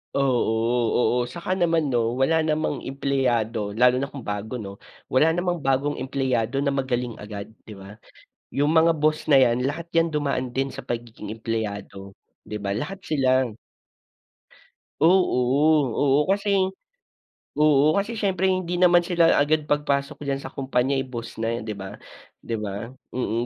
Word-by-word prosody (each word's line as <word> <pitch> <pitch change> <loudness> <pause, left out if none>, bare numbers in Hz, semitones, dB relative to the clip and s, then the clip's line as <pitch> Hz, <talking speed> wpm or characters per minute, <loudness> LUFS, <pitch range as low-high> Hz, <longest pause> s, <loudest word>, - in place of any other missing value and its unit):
Oo, 120 -2 +1
oo 120 - -1
saka 170 +8 -6
naman 165 -6 +1
'no, 120 0 +1
wala 160 +5 +2
namang 155 -2 0
empleyado 120 -6 -1
lalo 125 +2 +4
na 140 - -2
kung 135 -3 -9
bago 105 +4 -4
'no, 100 -4 -7 0.3
wala 160 +5 +4
namang 175 -1 -1
bagong 135 +1 0
empleyado 130 -1 -1
na 140 - +1
magaling 125 -3 -2
agad, 105 0 -8 0.2
'di 105 - -9
ba? 100 +3 -12 0.5
Yung 145 +2 0
mga 165 0 +4
boss 155 +1 0
na 145 - +5
yan, 125 0 +4
lahat 170 +4 -5
yan 165 0 +3
dumaan 130 -4 -1
din 135 0 -1
sa - - -9
pagiging 115 -3 -6
empleyado 105 -3 -5 0.3
'di 105 - -6
ba, 100 -1 -3
lahat 185 - -4
sila. 130 -6 +1 1.5
Oo, 175 -4 +4 0.6
oo, 140 0 +3
kasi 200 -1 +1 1.0
oo, 150 0 +4
kasi 220 +3 -2
syempre 190 -2 +1
hindi 180 -1 -1
naman 175 -1 +6
sila 170 -2 +4
agad 150 +1 +2
pagpasok 145 0 0
diyan 140 0 -2
sa 130 - -7
kompanya 130 0 0
ay 135 - -1
boss 120 -3 -8
na 115 +1 -1
yan - - -5
'di 110 - -3
ba, 95 0 -8 0.4
di 115 -1 -3
ba? 105 +2 -5 0.2
Mm, 120 -1 -1
135 Hz, 155 wpm, -24 LUFS, 115-155 Hz, 1.5 s, naman